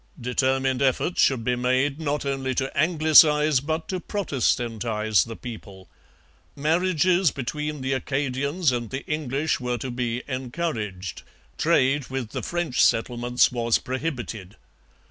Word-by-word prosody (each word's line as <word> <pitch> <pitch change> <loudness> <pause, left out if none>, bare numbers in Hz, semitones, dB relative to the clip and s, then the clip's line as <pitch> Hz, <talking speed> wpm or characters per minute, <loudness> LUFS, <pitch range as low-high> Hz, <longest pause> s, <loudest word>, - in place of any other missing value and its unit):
Determined 130 +1 0
efforts 135 +6 +1
should 130 -4 +3
be 125 +2 +1
made, 130 +4 0
not 145 -1 -2
only 135 -1 -2
to 135 +2 -2
Anglicize, 155 -2 +5
but 155 +4 -3
to 185 - -2
Protestantize 115 - 0
the 115 -1 -7
people. 100 -6 -10 0.7
Marriages 175 +3 +2
between 150 +3 -4
the 130 +1 -1
Acadians 140 +4 -1
and 120 -2 -3
the 135 +1 -5
English 150 0 -1
were 125 -1 -2
to 125 +3 -5
be 120 0 -2
encouraged. 125 - -4 0.4
Trade 135 +1 +2
with 130 -4 -4
the - - -4
French 175 -7 0
settlements 120 +1 +2
was 120 -2 +1
prohibited. 125 - -5
130 Hz, 125 wpm, -24 LUFS, 120-150 Hz, 0.7 s, Anglicize